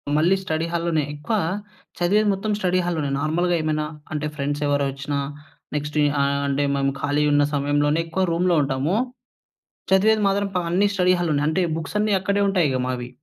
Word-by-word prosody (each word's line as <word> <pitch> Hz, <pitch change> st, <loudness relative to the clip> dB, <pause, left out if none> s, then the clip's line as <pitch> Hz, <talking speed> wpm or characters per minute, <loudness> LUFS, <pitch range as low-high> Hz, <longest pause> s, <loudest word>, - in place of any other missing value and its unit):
మళ్ళీ 170 Hz, +5 st, +4 dB
స్టడీ 160 Hz, -1 st, -1 dB
హాల్లోనే. 170 Hz, -2 st, 0 dB
ఎక్కువా 150 Hz, +9 st, -2 dB, 0.6 s
చదివేది 205 Hz, +5 st, +3 dB
మొత్తం 210 Hz, +3 st, -2 dB
స్టడీ 185 Hz, -1 st, +1 dB
హాల్లోనే. 155 Hz, -5 st, -1 dB
నార్మల్‌గా 170 Hz, +3 st, +1 dB
ఏమైనా 155 Hz, -1 st, -1 dB, 0.3 s
అంటే, 150 Hz, 0 st, -2 dB
ఫ్రెండ్స్ 145 Hz, 0 st, -2 dB
ఎవరొచ్చినా 140 Hz, 0 st, -1 dB, 0.6 s
నెక్స్టు 150 Hz, +1 st, -2 dB, 0.2 s
ఆహ్, 140 Hz, 0 st, +1 dB
అంటే, 140 Hz, +1 st, 0 dB
మేము 135 Hz, 0 st, +1 dB
ఖాళీ 145 Hz, +1 st, +1 dB
ఉన్న 145 Hz, 0 st, +4 dB
సమయంలోనే 145 Hz, +2 st, +1 dB
ఎక్కువ 185 Hz, +3 st, -1 dB
రూమ్‌లో 175 Hz, 0 st, +2 dB
ఉంటామూ. 140 Hz, +6 st, -1 dB, 1.0 s
చదివేది 215 Hz, +3 st, +4 dB
మాత్రం 200 Hz, +1 st, 0 dB
ప 180 Hz, -, +2 dB
అన్నీ 195 Hz, +4 st, +3 dB
స్టడీ 185 Hz, -1 st, +3 dB
హాల్లోనే 150 Hz, -4 st, +1 dB
అంటే, 180 Hz, +4 st, +1 dB, 0.2 s
బుక్సన్నీ 210 Hz, +5 st, 0 dB
అక్కడే 200 Hz, +2 st, 0 dB
ఉంటాయిగా 150 Hz, -10 st, +1 dB
మావి. 125 Hz, -1 st, -3 dB
155 Hz, 155 wpm, -23 LUFS, 145-185 Hz, 1.0 s, మళ్ళీ